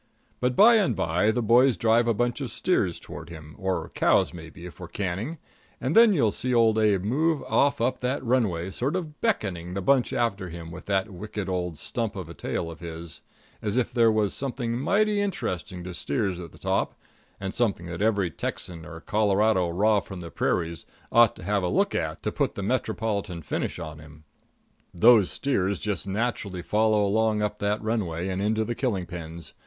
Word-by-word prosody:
But 125 0 0
by 230 - +7
and 140 - +2
by 90 +3 +1
the 120 +2 +1
boys 120 +3 +5
drive 115 +1 +3
a 115 - +3
bunch 120 +5 0
of 130 - -3
steers 105 - 0
toward 80 - -9
him, 75 -2 -10
or 95 -1 -2
cows - - +3
maybe, 85 +1 -10
if 90 - -10
we're 90 - -7
canning, 100 - -3 0.4
and 130 +5 -1
then 230 -1 +8
you'll 130 - +3
see 125 +3 -1
Old 110 -2 +4
Abe 105 -4 +3
move 150 +8 +1
off 140 0 +2
up 120 +3 0
that 130 +1 -2
runway, 100 -8 +1
sort 135 - -1
of 160 -5 -5
beckoning 95 - -1
the - - -1
bunch 130 +4 +3
after 100 -6 -1
him 85 0 -8
with 90 +1 -10
that 100 +1 0
wicked 100 +1 -5
old 90 -3 -2
stump 115 +4 -3
of 90 -4 -6
a - - -7
tail 85 0 -3
of 80 - -11
his, 85 -1 -7 0.4
as 105 +2 -1
if 125 - 0
there 115 -2 +5
was 105 -3 +1
something 125 -3 -2
mighty 205 - +2
interesting 95 - -3
to 90 0 -6
steers 90 +4 -1
at 85 -3 -8
the - - -16
top, - - -1 0.4
and 95 0 -4
something 105 -8 0
that 85 +2 -6
every 100 -5 +2
Texan 85 +3 -5
and 80 +1 -10
Colorado, 105 -3 +2
raw 105 +5 +3
from 95 -1 -8
the 85 -1 -8
prairies, 85 -1 -1 0.3
ought 115 -1 +5
to - - -11
have 100 -1 +1
a 90 - 0
look - - +1
at - - -2
to - - -1
put - - -1
a 100 - -3
metropolitan 105 -6 -2
finish - - -3
on 80 -2 -7
him. 75 0 -14 0.7
Those 110 +1 +6
steers 100 -8 0
just 100 -3 -2
naturally 100 -3 -2
follow 105 +1 +2
along 110 +1 +2
on - - +4
up 105 0 -4
that 105 +1 -1
runway 95 -6 -1
and 95 0 -2
into 110 +2 +1
the 120 - -2
killing 110 -8 -1
pens. 85 -2 -8
105 Hz, 200 wpm, -26 LUFS, 90-120 Hz, 0.7 s, then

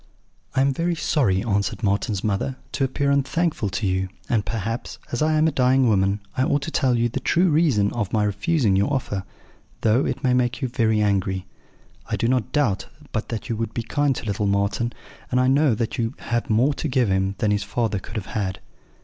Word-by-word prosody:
"'I 130 - +3
am 135 0 +3
very 170 +4 0
sorry,' 130 - +1
answered 100 0 -1
Marten's 100 0 0
mother, 105 +5 -1 0.2
'to - - -1
appear 140 +2 +1
unthankful 140 - 0
to 105 - -2
you; 95 0 0 0.2
and 110 -4 +1
perhaps, 115 +2 -4
as 120 - -2
I 155 +1 +3
am 155 +1 +4
a - - +2
dying 130 -1 +3
woman, 100 -1 +2
I - - 0
ought 140 +1 +1
to 160 - -4
tell 130 -6 +2
you 120 +1 +2
the 120 +3 -3
true 175 +6 +2
reason 140 -11 +3
of 105 -6 -2
my 110 -2 +2
refusing 105 - +1
your 100 +8 +2
offer, 105 -8 -2 0.6
though 115 +4 +3
it 135 - -3
may 125 -1 +3
make 125 -1 +1
you 130 -4 -2
angry. 100 -5 +1 0.6
I - - -1
do 115 - 0
not 125 -2 0
doubt 120 -10 +1 0.2
but 110 - -3
that 115 -2 -4
you 115 - -1
would 115 0 -3
be 115 - -1
kind 145 +3 +1
to - - -6
little 105 0 -1
Marten, 100 +4 0 0.4
and 125 - +2
I 130 - +3
know 135 -2 +4
that 115 +3 -3
you 115 +2 -1
have 120 0 -2
more 120 +7 +3
to 155 - -3
give 130 -4 +2
him 95 +1 +1
than 105 -2 +1
his 105 0 +1
father 110 -4 -1
could 110 - -11
have 105 -4 -5
had.' 95 -3 -2
115 Hz, 215 wpm, -23 LUFS, 100-135 Hz, 0.6 s, am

